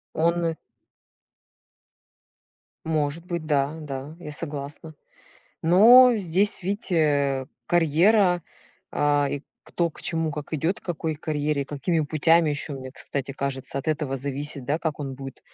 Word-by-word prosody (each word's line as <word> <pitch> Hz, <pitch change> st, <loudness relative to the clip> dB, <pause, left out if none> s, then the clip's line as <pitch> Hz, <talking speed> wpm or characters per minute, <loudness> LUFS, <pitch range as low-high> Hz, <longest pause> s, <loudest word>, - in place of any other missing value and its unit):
Он. 165 Hz, 0 st, +1 dB, 2.3 s
Может 155 Hz, +1 st, -1 dB
быть, 170 Hz, -3 st, -4 dB
да-да, 145 Hz, 0 st, -2 dB
я 150 Hz, -3 st, -8 dB
согласна. 150 Hz, 0 st, -6 dB, 0.7 s
Но 235 Hz, +8 st, +8 dB
здесь, 195 Hz, +1 st, +1 dB
видите, 195 Hz, -1 st, -2 dB
э, 140 Hz, -4 st, +2 dB, 0.2 s
карьера, 175 Hz, +3 st, +3 dB, 0.5 s
а, 145 Hz, -1 st, +2 dB
и 145 Hz, 0 st, -4 dB, 0.2 s
кто, 170 Hz, -1 st, -1 dB
к -, -, -14 dB
чему, 165 Hz, -2 st, -1 dB
как 150 Hz, +1 st, -6 dB
идет, 170 Hz, +8 st, -1 dB
к -, -, -45 dB
какой 160 Hz, -2 st, -3 dB
карьере 150 Hz, -1 st, -1 dB
и -, -, -7 dB
какими 155 Hz, +3 st, -1 dB
путями 160 Hz, +2 st, +3 dB
ещё 145 Hz, 0 st, -4 dB
мне 130 Hz, -1 st, -7 dB
кстати 135 Hz, +1 st, -5 dB
кажется 135 Hz, -1 st, -4 dB
от 135 Hz, -, -7 dB
этого 150 Hz, -3 st, -1 dB
зависит 140 Hz, +1 st, -3 dB
да, 145 Hz, +5 st, 0 dB
как 160 Hz, -3 st, -2 dB
он 135 Hz, -2 st, -5 dB
будет 135 Hz, 0 st, -9 dB
155 Hz, 135 wpm, -25 LUFS, 140-170 Hz, 2.3 s, Но